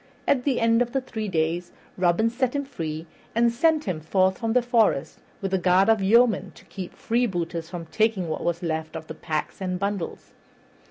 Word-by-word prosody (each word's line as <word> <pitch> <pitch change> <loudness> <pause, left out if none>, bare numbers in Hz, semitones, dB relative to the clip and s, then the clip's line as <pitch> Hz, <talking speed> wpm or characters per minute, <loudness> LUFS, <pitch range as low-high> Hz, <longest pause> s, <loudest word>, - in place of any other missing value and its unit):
At 255 -3 +2
the 275 -4 +2
end 230 +1 +3
of 240 0 -1
three 220 -3 -4
days 170 0 -1 0.2
Robin 185 +5 +2
set 250 +2 -1
him 280 0 -1
free, 160 - -5 0.3
and 235 0 +4
sent 310 +5 +2
him 180 -5 -2
forth 185 +4 +1
from 225 -2 -1
the 250 0 +3
forest 230 - +2 0.2
with 195 -1 -3
a 190 - +3
guard 185 +3 +4
of 220 -2 +4
yeomen 225 +2 +3
to - - -16
keep 185 -3 -8
freebooters 175 -8 -1
from 170 -2 -6
taking 215 0 +1
what 155 - -3
was 170 0 -1
left 160 -1 -3
of 160 0 -6
the - - -7
packs 155 +3 -4
and 185 -1 -1
bundles. 200 -2 -4
190 Hz, 195 wpm, -25 LUFS, 170-230 Hz, 0.3 s, and